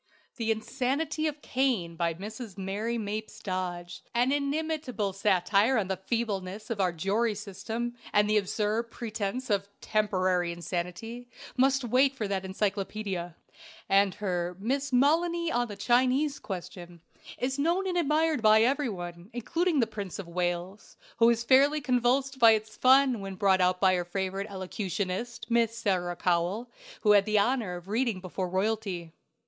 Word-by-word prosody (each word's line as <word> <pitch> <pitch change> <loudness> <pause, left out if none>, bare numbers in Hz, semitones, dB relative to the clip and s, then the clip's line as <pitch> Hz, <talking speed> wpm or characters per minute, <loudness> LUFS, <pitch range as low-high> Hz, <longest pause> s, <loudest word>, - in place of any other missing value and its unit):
"The 225 -2 -2
Insanity 275 +8 -1
of 295 -1 -5
Cain," 240 -11 0
by 170 -1 0
Mrs. 215 +2 -8
Mary 205 +5 -2
Mapes 215 0 -5
Dodge, 180 -3 -4
an 245 +3 +3
inimitable 285 -7 -1
satire 200 +5 +2
on 195 -4 -1
the 190 - 0
feebleness 210 -3 -2
of 210 -3 -1
our 185 -2 +2
jury 205 +7 0
system 225 +4 -5 0.2
and 210 0 +4
the 215 0 +3
absurd 215 +3 -1
pretence 225 +1 -4
of 200 0 0
"temporary 185 -4 +1
insanity," 180 +8 -5 0.3
must 270 +1 +3
wait 260 +3 +3
for 220 -6 -2
that 195 -1 -1
encyclopædia. 195 -2 -3 0.5
And 195 -1 +3
her 180 -3 -2
"Miss 270 +7 -1
Molony 335 +6 +2
on 240 0 +1
the 205 - -7
Chinese 260 +6 +2
Question" 175 -2 -8 0.4
is 265 +2 -2
known 340 +6 +1
and 370 -2 -1
admired 315 -3 +2
by 215 0 +6
every 270 +2 +1
one, 175 -1 -7
including 325 +6 0
the - - +3
Prince 205 -4 -6
of 195 - -7
Wales, 175 +3 -3 0.2
who 230 - +5
was 235 0 +3
fairly 275 +5 +5
convulsed 260 0 +1
by 230 -2 +8
its 215 0 -3
fun, 260 -2 +5
when 195 -1 -6
brought 190 -1 +3
out 180 0 +2
by 185 -1 +4
our 175 - 0
favorite 195 +2 -3
elocutionist, 195 +3 -4
Miss 230 -1 +2
Sarah 185 -6 0
Cowell, 180 +7 0 0.3
who 210 - +4
had 200 -1 +6
the 215 0 +2
honor 210 -3 +1
of 175 +1 -10
reading 225 -1 0
before 185 0 -4
royalty. 190 -3 -2
215 Hz, 155 wpm, -28 LUFS, 190-250 Hz, 0.5 s, by